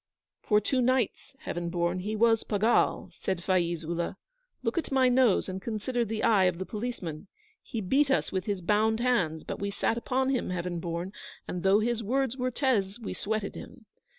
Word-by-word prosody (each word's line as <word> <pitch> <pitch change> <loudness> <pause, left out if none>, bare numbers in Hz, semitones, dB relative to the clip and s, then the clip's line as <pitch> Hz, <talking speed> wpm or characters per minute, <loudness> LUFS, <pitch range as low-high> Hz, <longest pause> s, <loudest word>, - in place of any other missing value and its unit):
'For 210 -1 +3
two 255 +5 0
nights, 255 +1 0
Heaven 175 0 -3
born, 175 +1 0
he 210 +4 -3
was 225 0 +3
pagal' 215 +3 +2
said 185 -2 -3
Faiz 175 -3 +1
Ullah. 170 +1 -2 0.5
'Look 230 +6 0
at 320 - -5
my 260 -1 +4
nose, 245 -5 +4
and 190 0 -5
consider 235 +3 -1
the 220 -1 -3
eye 200 -4 +5
of 180 -2 +1
the 190 - -4
policeman. 205 -7 -5 0.3
He 225 - -5
beat 270 +9 +2
us 270 - +1
with 185 -1 -2
his 200 -3 -2
bound 215 +5 +2
hands; 190 -11 +1
but - - -5
we 200 - -2
sat 225 +3 0
upon 260 +2 0
him, 260 -3 0
Heaven 175 -1 -2
born, 170 +3 -4 0.3
and 180 - -4
though 195 +3 +4
his 235 +1 0
words 260 +3 0
were 255 -1 -1
tez, 235 -6 0
we 225 - -5
sweated 215 -1 -2
him. 220 - -11
210 Hz, 190 wpm, -29 LUFS, 180-240 Hz, 0.5 s, eye